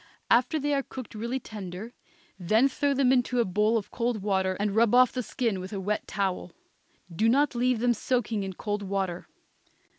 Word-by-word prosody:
After 250 +7 +4
they 290 0 0
are 275 - +2
cooked 260 -3 -9
really 235 +4 -3
tender, 210 0 -8 0.5
then 215 +9 +3
throw 280 +1 0
them 265 -2 +3
into 250 -1 +1
a 235 - +3
bowl 210 +5 +2
of 210 - -5
cold 235 -4 -2
water 190 -2 0
and 205 0 -1
rub 230 +1 +4
off 250 -1 +6
the 255 - -2
skin 230 -4 -2
with 185 +3 -7
a 200 - -3
wet 205 +2 -2
towel. 190 -4 -2 0.6
Do 220 +5 +3
not 280 +4 +3
leave 250 0 +1
them 240 +2 +2
soaking 235 -3 -1
in 190 -1 -4
cold 205 +2 -3
water. 190 -3 -3
220 Hz, 190 wpm, -27 LUFS, 195-250 Hz, 0.6 s, off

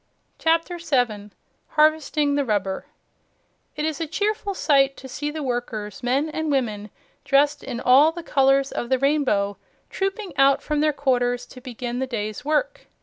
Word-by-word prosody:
CHAPTER 330 +2 +1
7 240 -10 -1 0.5
HARVESTING 305 -1 +3
THE 285 0 +1
RUBBER 200 -5 -2 0.9
It 300 +1 -2
is 315 -1 -2
a 325 - -2
cheerful 410 +3 -2
sight 275 -5 +3
to 265 - -10
see 295 +3 -4
the 305 0 -5
workers, 230 -5 -4
men 265 +5 +1
and 315 0 -3
women, 215 -6 -1 0.3
dressed 285 +1 +2
in 235 - -5
all 270 +6 +5
the 345 +1 -8
colors 275 -2 +2
of 240 - -4
the 260 - +3
rainbow, 255 -8 +1 0.3
trooping 390 -3 -3
out 275 0 +4
from 300 -1 -1
their 305 +1 +3
quarters 245 -4 0
to 255 - -13
begin 245 0 -5
the 265 - -1
day's 215 -4 -4
work. - - -1
275 Hz, 160 wpm, -23 LUFS, 245-310 Hz, 0.9 s, all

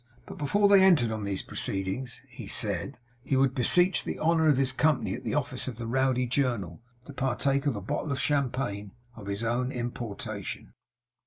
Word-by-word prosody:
But - - -10
before 200 +8 +3
they 200 -1 +7
entered 155 -12 +5
on 110 -2 -3
these 100 -1 -2
proceedings 100 +6 -4
(he - - -10
said), - - -1 0.3
he 135 - 0
would 135 -1 +3
beseech 175 +7 +3
the - - -4
honour 160 0 +3
of 145 - +4
his 135 -1 +2
company 150 +1 +1
at - - -6
the - - -2
office - - -2
of 125 -4 -5
the 120 - -5
Rowdy 130 +1 +1
Journal, 120 - -1 0.2
to 140 - -10
partake 135 +2 0
of 135 - +1
a 100 - -4
bottle 140 - -3
of 135 - -1
champagne 125 -8 -1 0.2
of 105 -3 -10
his 100 +3 -3
own 125 +3 0
importation. 120 -4 -5
130 Hz, 185 wpm, -28 LUFS, 115-140 Hz, 0.3 s, they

